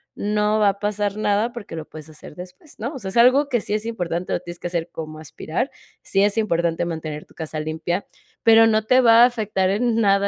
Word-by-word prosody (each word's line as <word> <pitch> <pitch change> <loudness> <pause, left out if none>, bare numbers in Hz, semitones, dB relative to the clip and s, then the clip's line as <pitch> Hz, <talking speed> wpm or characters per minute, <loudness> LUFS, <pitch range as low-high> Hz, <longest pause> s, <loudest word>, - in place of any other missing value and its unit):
no 210 +1 0
va 210 -1 +4
a 200 0 -4
pasar 205 -1 -1
nada, 210 +2 +1
porque 225 -8 -8
lo 160 -1 -6
puedes 155 -1 -11
hacer 150 -1 -13
después, 180 - -12
¿no? 240 +7 -4
O 270 - -7
sea, 195 -5 -6
es 190 - -4
algo 260 +5 +5
que 240 -4 +1
sí 205 - -4
es 215 +1 -2
importante, 180 -6 -3
lo - - 0
tienes 175 -1 -10
que - - -4
hacer, 170 -1 -3
como 155 -1 -7
aspirar, 155 - -4 0.3
sí 195 0 +1
es 205 +1 +1
importante 170 -6 0
mantener 155 -3 -5
tu - - -23
casa 160 -1 -5
limpia, 160 +4 -3 0.4
pero 225 0 +7
no 220 -1 +2
te 255 +3 +4
va 230 -1 +7
a - - +9
afectar 215 -6 0
en 230 +3 +1
nada, 200 -1 +3
200 Hz, 235 wpm, -22 LUFS, 170-225 Hz, 0.4 s, a